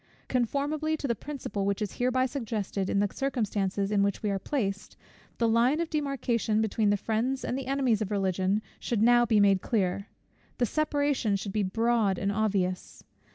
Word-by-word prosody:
Conformably 285 +5 0
to 285 - -3
the 235 - +2
principle 230 -5 -5
which 200 0 0
is 210 -3 -4
hereby 255 +1 +2
suggested, 220 -7 -3
in - - 0
the 205 0 +2
circumstances 205 -7 -1
in 205 -1 +3
which 200 +1 0
we 210 - +1
are 195 - -1
placed, 200 -7 -3 0.4
the 230 - +2
line 235 +7 +3
of 335 -1 -2
demarcation 255 -7 0
between 220 -1 +1
the 205 - +3
friends 235 +6 -1
and - - -2
the 265 -1 -4
enemies 265 -6 +1
of 210 - -2
Religion 195 0 0 0.2
should 220 -3 0
now 240 0 +5
be 220 -2 +4
made 200 -2 +4
clear; 200 -3 -1 0.5
the 245 - +2
separation 285 -5 0
should 195 0 -4
be 215 - +1
broad 220 0 +1
and 200 +2 0
obvious. 195 -3 -1
220 Hz, 180 wpm, -28 LUFS, 200-255 Hz, 0.5 s, now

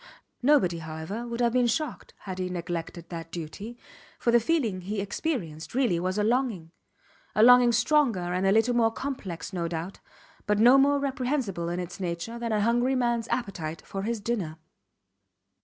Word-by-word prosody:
Nobody, 245 - +3
however, 160 +9 -6
would 235 0 -3
have 235 -1 +2
been 250 -1 +3
shocked 305 +5 -3
had 185 -2 -6
he 185 0 -2
neglected 170 -1 -5
that 165 -1 -7
duty, 180 +8 -7 0.4
for 235 - +1
the 240 - +6
feeling 230 - 0
he 200 +3 -3
experienced 195 - -3
really 240 -10 +2
was 185 +3 -1
a 210 - +2
longing 220 -8 0 0.6
a 215 - +5
longing 245 0 +8
stronger 225 - +2
and 185 +1 +1
a - - +4
little 225 +4 +3
more 230 -1 +4
complex 210 -9 -5
no 170 -2 -1
doubt, 170 +3 -5 0.5
but 210 0 +2
no 245 +5 +7
more 285 +1 +4
reprehensible 255 - -2
in 175 +1 -2
its 180 +1 -6
nature 180 +6 -4
than 235 -1 -3
a 210 -1 +1
hungry 240 +4 +2
mans 235 -2 0
appetite 170 -11 -3
for 195 - -5
his 225 +2 -2
dinner. 200 -8 -3
210 Hz, 175 wpm, -27 LUFS, 175-240 Hz, 0.6 s, longing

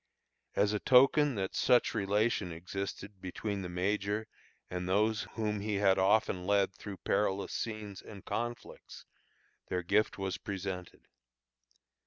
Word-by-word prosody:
As 105 +1 +3
a 105 - 0
token 135 +2 +5
that 95 -2 -2
such 120 -1 +3
relation 105 -2 +1
existed 95 +3 -6
between 100 +2 -3
the 90 - -5
major 100 +4 -1 0.4
and 90 0 -4
those 105 +3 +2
whom 105 -2 -1
he 105 +1 -2
had 100 -1 +3
often 95 -2 +2
led 100 -1 +3
through 100 +1 -8
perilous 100 -1 0
scenes 105 -3 -4
and 100 -3 -11
conflicts, 120 0 -5 0.6
their 90 -1 -2
gift 105 +5 +2
was 95 -1 -3
presented. 95 -2 -5
100 Hz, 130 wpm, -32 LUFS, 95-110 Hz, 0.6 s, token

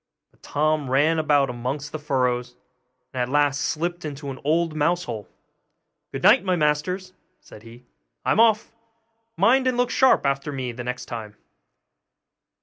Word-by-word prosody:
But - - -32
Tom 150 -2 0
ran 150 +5 +3
about 145 -3 +3
amongst 135 +5 -4
the 155 - -5
furrows, 125 -4 -1 0.6
and 130 - -2
at 125 - -1
last 145 0 +2
slipped 175 +4 -2
into 145 -2 -6
an 130 - -9
old 160 +2 +1
mouse 170 +4 +1
hole. 110 -4 -6 0.8
'Good - - -6
night, - - +6
my 185 -2 +1
masters!' 175 +5 -1 0.3
said 105 - -15
he, 115 +2 -15 0.4
'I'm - - +2
off! 220 -2 +4 0.7
mind 260 +2 +4
and 255 -1 +1
look 245 +1 +1
sharp 260 - +4
after 140 +1 -1
me 130 -3 -4
the 120 +1 -7
next 125 +1 -5
time. 110 -3 -7
145 Hz, 155 wpm, -23 LUFS, 125-170 Hz, 0.8 s, night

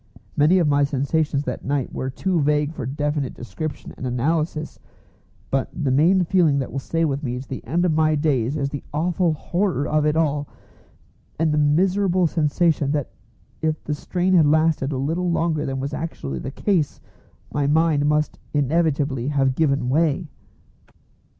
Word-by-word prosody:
Many 155 +6 +4
of 170 -4 +3
my 145 0 +3
sensations 140 +1 0
that 125 -3 -5
night 140 -2 -2
were 130 - -3
too 175 +5 0
vague 150 +1 +1
for 135 -6 -5
definite 145 0 -2
description 155 +5 -6
and 130 - -4
analysis, 155 +5 -1 0.7
but 135 -1 0
the 140 -4 -1
main 170 +8 +4
feeling 165 -5 +3
that 135 - -2
will 135 - -3
stay 165 +4 -1
with 140 -2 -1
me 125 -3 -3
to 130 - -9
the 130 - -6
end 175 +2 +1
of 170 - +2
my 155 0 +3
days 145 -3 0
is 140 -1 -1
the 145 - -5
awful 170 +1 +1
horror 170 -1 -1
of 155 0 +1
it 150 - +1
all, 150 -3 0 0.9
and 155 -1 +1
the 150 - +2
miserable 185 +5 +2
sensation 155 -1 +1
that 145 -3 -2 0.5
if 155 -1 -1
the 150 - -2
strain 180 +5 -1
had 165 -5 +5
lasted 155 -2 +2
a 135 - -2
little 165 +7 -1
longer 165 -3 0
than 135 0 -3
was 140 +2 -4
actually 70 - -4
the - - -5
case 165 0 0 0.5
my 145 -1 +1
mind 150 -1 +3
must 150 0 0 0.2
inevitably 145 -3 +1
have 135 -2 +2
given 140 -3 +1
way. 155 +3 +1
150 Hz, 170 wpm, -22 LUFS, 140-165 Hz, 0.9 s, had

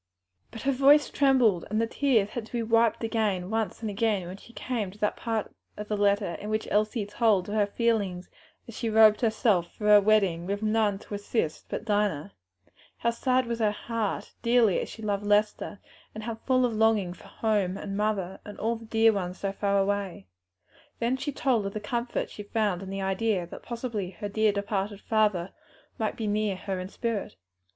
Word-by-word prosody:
But 225 - -9
her 275 - +2
voice 280 +3 +5
trembled, 250 -10 +3
and 215 +1 0
the 230 - +2
tears 230 -4 +1
had 230 -3 -5
to - - -21
be 235 -1 -1
wiped 230 0 +2
away 220 -5 0
once 220 +4 -2
and 220 - -2
again 205 -3 0
when 185 +2 -7
she 235 - -16
came 235 -4 -3
to 195 - -14
that 210 0 0
part 225 -2 -3 0.2
of 210 0 -7
the 210 - 0
letter 200 -2 +2
in 210 - -5
which 215 0 -1
Elsie 215 +1 +1
told 205 -3 +2
of 205 - -4
her 210 -2 +2
feelings 200 -5 0 0.4
as 230 - -10
she 230 - -2
robed 215 0 +6
herself 220 -6 +2
for 210 - -6
her 210 -1 +8
bridal 200 -5 +3
with 200 +3 -3
none 215 -2 +2
to 205 - -11
assist 200 -5 -2
but - - -4
Dinah; 205 -6 0 0.6
how 235 - +1
sad 255 +2 +1
was 235 0 -3
her 215 -2 +3
heart, 220 0 -3
dearly 235 -5 +4
as - - -4
she 220 - -10
loved 205 -1 -1
Lester, 210 0 +1 0.4
and 215 - -6
how 230 +1 -3
full 255 +3 +1
of 240 - -1
longing 215 -5 +2
for - - -15
home 205 -4 0
and 195 0 -5
mother 200 -3 -1
and 210 - -10
all 230 +1 -1
the 225 - -12
dear 225 0 +4
ones 180 -2 -3
so 195 - -2
far 200 0 0
away; 195 - -1 0.7
then 235 +2 0
of 260 -6 0
the 215 - -3
comfort 235 +3 -3
she - - -8
found 205 -3 -1
in 195 - -7
the 195 0 -3
idea 195 -1 0
that 170 - -10
possibly 230 -6 -5
the 205 -2 -3
dear 215 +1 +2
departed 200 0 -2
father 210 -6 +1 0.5
might 220 -1 -1
be 225 - -3
near 210 -1 0
her 190 0 -4
in 185 +1 -5
spirit. 225 - -3
215 Hz, 200 wpm, -27 LUFS, 200-225 Hz, 0.7 s, her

